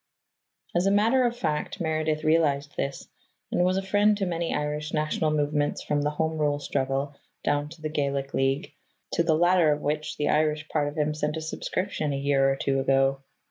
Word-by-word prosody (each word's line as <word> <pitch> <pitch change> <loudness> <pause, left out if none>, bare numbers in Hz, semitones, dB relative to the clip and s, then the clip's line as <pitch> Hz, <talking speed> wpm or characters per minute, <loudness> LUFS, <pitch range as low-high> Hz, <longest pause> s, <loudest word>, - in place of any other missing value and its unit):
As 175 +2 +2
a - - +4
matter 230 +6 +4
of 240 0 -4
fact, 155 -2 -2
Meredith 155 -2 -1
realized 150 -3 +2
this, 140 - -3 0.4
and 175 - +2
was 185 +1 +2
a 195 - -1
friend 205 +2 +3
to 195 - -1
many 170 -2 -2
Irish 150 +1 -2
national 155 +1 0
movements 150 -1 0
from 145 -1 0
the 145 - +1
Home 160 +1 -2
Rule 145 -1 +1
struggle 140 0 -2 0.3
down 145 0 0
to 160 0 -14
the 155 - -1
Gaelic 140 -2 -2
League, 135 +6 0 0.4
to - - +1
the 165 -2 +3
latter 175 -1 +4
of 150 0 -1
which 150 +1 -2
the 150 - 0
Irish 155 0 +1
part 150 -2 0
of 145 +2 -6
him 150 0 +1
sent 150 +1 -2
a - - -4
subscription 160 -1 -2
a - - -1
year 140 -1 +2
or 135 - +1
two 135 0 0
ago. 135 0 +2
150 Hz, 200 wpm, -26 LUFS, 145-165 Hz, 0.4 s, a